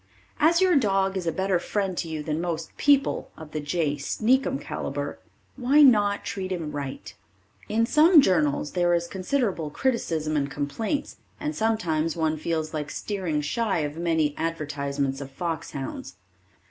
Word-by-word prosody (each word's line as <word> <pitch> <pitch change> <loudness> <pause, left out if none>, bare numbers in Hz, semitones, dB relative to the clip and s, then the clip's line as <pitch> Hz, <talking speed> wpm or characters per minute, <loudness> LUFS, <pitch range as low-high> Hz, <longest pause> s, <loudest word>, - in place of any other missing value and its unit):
As 335 +3 +4
your 370 -2 +4
dog 195 -6 +2
is 180 -3 -3
a - - +2
better 190 +1 0
friend 195 0 -2
to 170 - -2
you 155 -1 -4
than 155 +1 -2
most 165 -2 -4
people 285 -1 +2
of 155 -1 -10
the 155 - -3
J. 150 -1 -1
Sneakum 255 - +1
caliber, 145 +1 -4 0.4
why 275 +4 +5
not 205 -6 +4
treat 190 -1 -4
him 165 -5 -3
right? 140 -2 -6 0.6
In 225 +2 +2
some 305 +7 +6
journals 155 - +2
there 175 -1 +2
is 170 0 0
considerable 190 - -1
criticism 160 - -1
and 140 -1 0
complaints, 215 - -3 0.2
and 300 +1 -3
sometimes 165 -8 0
one 160 -2 0
feels 155 0 -2
like 150 -2 -3
steering 180 -5 -2
shy 195 +3 0
of 145 0 -3
many 160 -3 +1
advertisements 145 -4 -2
of 135 - -6
fox 165 +4 -4
hounds. 135 -9 -6
170 Hz, 160 wpm, -26 LUFS, 150-215 Hz, 0.6 s, some